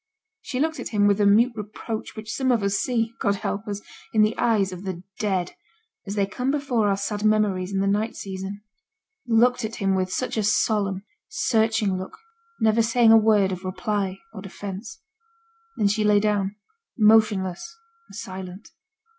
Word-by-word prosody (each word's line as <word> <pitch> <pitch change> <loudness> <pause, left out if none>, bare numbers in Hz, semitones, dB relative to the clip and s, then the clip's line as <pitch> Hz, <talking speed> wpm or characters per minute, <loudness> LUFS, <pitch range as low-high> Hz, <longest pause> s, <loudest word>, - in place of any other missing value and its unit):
She 255 - -4
looked 320 0 0
at - - -4
him 205 -2 +2
with 205 0 +3
the 205 - +4
mute 230 +5 +4
reproach 215 +1 -6
which 215 -1 -6
some 260 -1 +1
of 230 -4 +1
us 200 0 +1
see 230 +1 0
(God 200 - +1
help 200 +2 -4
us!) 205 -1 -4 0.3
in 215 - +6
the 215 +1 +1
eyes 210 -5 +1
of 185 +1 -8
the 185 -2 -5 0.2
dead, 190 -4 -1 0.5
as 200 - -4
they 200 -2 +2
come 250 +6 -3
before 270 -7 +1
our 195 - +1
sad 205 +1 -3
memories 205 -3 +1
in 195 -1 0
the - - +1
night 210 +3 0
season; 195 +1 -6 0.6
looked 240 +2 +3
at 220 +1 -4
him 195 -2 0
with 185 -1 0
such 255 +1 -2
a 215 - +1
solemn, 205 -2 +1 0.2
searching 220 - +1
look, 185 - -8 0.4
never 220 +1 +3
saying 230 0 +4
a - - +9
word 210 -3 +4
of 185 0 -5
reply 190 +1 -2 0.2
or 195 - -8
defence. 200 +3 -8 0.8
Then 210 - +3
she 210 +2 +1
lay 210 -1 +4
down, 205 -1 0 0.4
motionless 215 - +3 0.3
and - - -12
silent. 190 -2 -8
210 Hz, 180 wpm, -24 LUFS, 195-225 Hz, 0.8 s, a